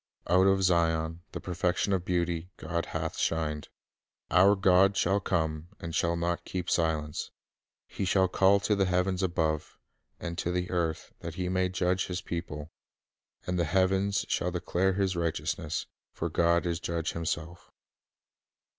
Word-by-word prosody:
Out 95 +2 +4
of 95 0 +3
Zion, 80 -2 +2
the - - -5
perfection 90 +2 0
of 90 -2 0
beauty, 85 -1 -1
God 85 -1 -3
hath - - -3
shined. 75 -2 -1 0.6
Our 95 +3 +6
God 95 0 +4
shall 95 +3 +2
come, 80 -4 -1
and 85 -1 -6
shall 85 +1 +1
not 85 +1 -1
keep 90 -1 -4
silence." 80 -3 0 0.3
" - - -65
He - - -4
shall 95 0 +3
call 95 +2 +4
to 105 - +2
the 95 -1 +2
heavens 90 +1 +1
above, 80 -4 -1 0.4
And 85 0 -5
to 90 - -1
the 90 0 -2
earth, 85 -3 -2
that 85 -1 -6
He 90 0 -2
may 95 0 +1
judge 90 0 0
His 90 -1 -3
people;... 80 -3 -5 0.7
And 90 0 -1
the 85 - +2
heavens 95 +3 +2
shall 90 - 0
declare 90 +2 0
His 95 -1 0
righteousness; 80 -1 -2 0.3
For - - -3
God 85 +1 +3
is 85 -1 -1
judge 85 -1 -2
Himself." 85 +1 -4
90 Hz, 155 wpm, -29 LUFS, 85-95 Hz, 0.7 s, Our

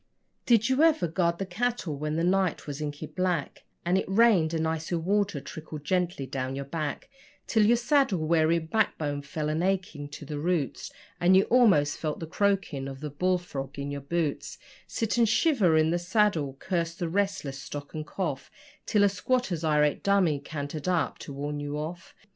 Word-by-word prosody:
Did 230 -2 +4
you 260 +2 +2
ever 315 - +4
guard 170 +1 0
the 195 - -3
cattle 200 -4 -2
when 150 +2 -3
the 165 - 0
night 185 -1 +1
was 145 0 -6
inky 145 +1 -4
black, 180 -3 -2 0.2
And 180 +2 +3
it - - -4
rained, 195 -6 +4
and 160 -1 0
icy 160 +2 -2
water 195 0 0
trickled 155 +1 -8
gently 175 -4 0
down 130 0 -3
your 140 0 -4
back 150 0 -4 0.4
Till 220 -2 +3
your 240 +2 +5
saddle 265 -4 +2
weary 160 +1 +2
backbone 160 -4 -1
fell 150 +2 -4
a 155 +3 0
aching 185 -6 -1
to 150 +1 -9
the 145 0 -5
roots 160 -5 -1 0.3
And 180 +2 +5
you 195 - +5
almost 195 -13 +4
felt 155 -2 -3
the 165 - -4
croaking 185 -6 0
of 135 -1 -7
the 150 -1 -5
bull 180 +5 +1
frog 140 -6 -7
in 140 0 -4
your 140 0 -4
boots 155 +1 -2 0.3
Sit 225 0 -1
and 230 -2 +4
shiver 225 - +3
in 155 +1 +3
the 175 - +1
saddle, 175 -7 +1
curse 170 0 -2
the 175 -1 -3
restless 195 -7 -1
stock 145 +1 -7
and 155 - -4
cough 150 -3 -4 0.4
Till 205 -1 +3
a - - +6
squatter's 195 -3 -1
irate 150 -2 +2
dummy 190 -7 +2
cantered 145 +2 -6
up 180 -2 0
to - - -8
warn 145 +1 -4
you 145 0 -4
off? 165 +3 -6
165 Hz, 190 wpm, -28 LUFS, 150-195 Hz, 0.4 s, a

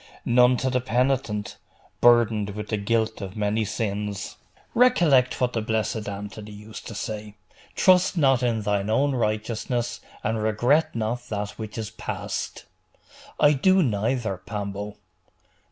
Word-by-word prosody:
'None 125 +1 +5
to 130 +1 -1
the 125 0 +1
penitent, 125 -4 0 0.4
burdened 110 -4 +4
with 105 -1 -6
the 110 - 0
guilt 110 +1 0
of 95 +1 -7
many 105 +1 +1
sins.' 105 -1 -3 0.4
'Recollect 170 - +4
what 125 -1 +1
the 115 - 0
blessed 110 -1 -1
Anthony 105 +1 -7
used 105 +1 -10
to 115 - -7
say 105 0 -5 0.4
"Trust 185 0 +4
not 135 -5 +4
in 115 -3 0
thine 100 0 0
own 140 +5 +2
righteousness, 115 +1 -2 0.2
and 110 0 -1
regret 120 +9 +2
not 115 +2 -3
that 105 -1 -2
which 110 0 -8
is 110 -2 -4
past."' - - -5 0.7
'I 145 0 +6
do 185 +7 +4
neither, 110 - -1
Pambo. 100 +1 -5
110 Hz, 135 wpm, -25 LUFS, 105-125 Hz, 0.7 s, I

